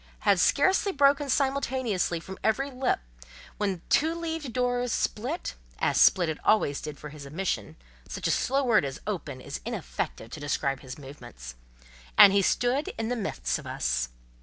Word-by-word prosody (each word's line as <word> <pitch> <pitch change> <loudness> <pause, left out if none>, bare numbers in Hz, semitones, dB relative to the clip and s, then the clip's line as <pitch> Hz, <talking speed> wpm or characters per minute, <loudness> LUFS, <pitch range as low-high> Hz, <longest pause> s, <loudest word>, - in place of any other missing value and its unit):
had - - +4
scarcely 385 +1 +3
broken 280 -2 +3
simultaneously 260 -10 0
from 190 +3 -9
every 270 +6 +1
lip, 255 - 0 0.6
when 205 -1 0
the 175 - -11
two 320 +3 +2
leaved 325 -5 -4
door 245 0 0
split 245 +6 -2 0.2
(as - - +2
split 180 -3 +6
it 160 -1 -3
always 175 -10 +2
did 150 -1 -6
for 150 - -9
his 145 -1 -10
admission—such 100 - -5
a - - +2
slow 275 +2 +1
word 235 - +4
as 135 -1 -4
"open" 165 -10 -4
is - - -7
inefficient 60 - -4
to 155 - -6
describe 140 -1 -1
his 130 -1 -9
movements), 135 - -10 0.6
and 195 - +10
he 200 - +4
stood 245 +8 +1
in 225 0 -2
the 245 - 0
midst 210 -5 -2
of - - -10
us. - - -1
200 Hz, 165 wpm, -27 LUFS, -, 0.6 s, and